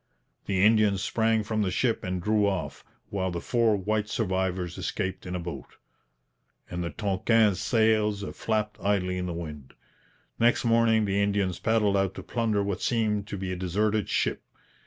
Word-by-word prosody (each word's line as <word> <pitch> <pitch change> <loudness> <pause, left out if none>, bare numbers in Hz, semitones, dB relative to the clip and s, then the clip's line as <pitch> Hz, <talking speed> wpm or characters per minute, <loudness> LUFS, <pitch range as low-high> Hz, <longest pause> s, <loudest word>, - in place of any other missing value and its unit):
The 95 -1 +3
Indians 105 -3 +3
sprang 110 -1 +1
from 110 0 -1
the 100 - +1
ship 115 +5 0
and 95 -1 -2
drew 105 0 +2
off, 95 -4 -3 0.3
while 95 -2 -1
the 85 -1 -3
four 115 +2 +2
white 105 +2 -1
survivors 95 -4 -1
escaped 95 -2 -3
in 90 - -4
a - - -2
boat, 85 0 -7 1.0
and 90 0 -3
the 85 - -2
Tonquin's 100 +3 +2
sails 110 -3 +2
flapped 105 -1 -2
idly 90 -2 0
in 90 - -3
the - - -3
wind. 75 -5 -8 0.6
Next 120 +1 +3
morning 115 -1 +3
the 100 0 +1
Indians 100 -3 0
paddled 110 -3 +2
out 95 -1 0
to 95 - -7
plunder 110 -1 0
what 100 -2 -3
seemed 105 -3 0
to 100 - -5
be 95 -1 -4
a - - -2
deserted 105 +4 0
ship. - - 0
100 Hz, 170 wpm, -27 LUFS, 95-110 Hz, 1.0 s, The